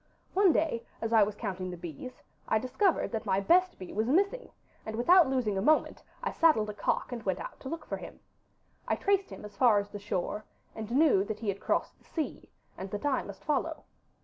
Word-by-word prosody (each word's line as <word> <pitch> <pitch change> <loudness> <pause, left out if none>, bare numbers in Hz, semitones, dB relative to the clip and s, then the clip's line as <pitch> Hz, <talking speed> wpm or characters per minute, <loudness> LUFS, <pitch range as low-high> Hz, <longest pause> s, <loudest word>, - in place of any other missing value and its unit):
One 390 -2 +5
day, 305 -8 0 0.2
as 225 0 -2
I 225 - +7
was 205 0 +2
counting 185 -4 -4
the 180 - -6
bees, 175 - -9 0.2
I 220 - +3
discovered 265 - +1
that 225 -2 -2
my 190 - +2
best 360 - +3
bee 185 - -9
was 220 +4 0
missing, 400 - +1 0.3
and 220 - -5
without 340 +7 +6
losing 230 -7 0
a - - -1
moment 310 +8 +2 0.2
I 470 - -1
saddled 225 -11 +3
a - - -10
cock 210 - -1
and 240 -2 -4
went 190 -3 -1
out - - -8
to 265 - -7
look 330 +2 -5
for - - -4
him. - - -10 0.7
I - - +2
traced 395 -1 +1
him - - -9
as 205 -1 -11
far 235 -3 +5
as 200 0 -1
the 205 - -7
shore, 205 +1 -3 0.3
and 220 -1 -6
knew 260 -6 +4
that 215 +1 -5
he 220 - -1
had 195 0 -2
crossed - - -1
the - - -27
sea, 315 -3 -4 0.3
and 190 +1 -5
that 205 +7 -5
I 275 -3 +2
must 200 - -10
follow. 310 +2 -1
230 Hz, 225 wpm, -30 LUFS, 205-315 Hz, 0.7 s, I